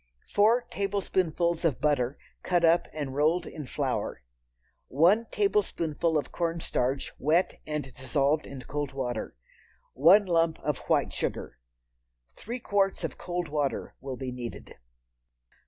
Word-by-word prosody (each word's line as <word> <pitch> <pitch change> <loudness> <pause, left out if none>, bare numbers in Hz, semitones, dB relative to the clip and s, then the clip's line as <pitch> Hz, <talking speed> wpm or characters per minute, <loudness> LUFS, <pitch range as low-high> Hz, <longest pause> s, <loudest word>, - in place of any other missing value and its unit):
Four 225 +4 +4
tablespoonfuls 185 -4 0
of 160 -6 +1
butter, 140 -3 +1 0.2
cut 175 -2 +2
up 165 +1 +4
and 145 -3 -4
rolled 155 +5 +2
in 150 -4 -7
flour. - - -2 0.6
One 185 - +4
tablespoonful 170 - +1
of 145 - -3
cornstarch 160 -6 -1
wet 160 +6 +1
and 150 -4 -4
dissolved 140 +3 0
in 135 -2 -8
cold 145 +1 -4
water. 125 - -3 0.6
One 180 +9 +6
lump 165 -2 +2
of 150 -3 -1
white - - +2
sugar. - - -3 0.7
Three 240 +4 -6
quarts 200 -4 +1
of - - -4
cold 175 -1 -3
water 145 -2 -1
will 135 -2 -5
be 130 -1 -4
needed. 125 -2 -7
155 Hz, 125 wpm, -28 LUFS, 135-180 Hz, 0.7 s, One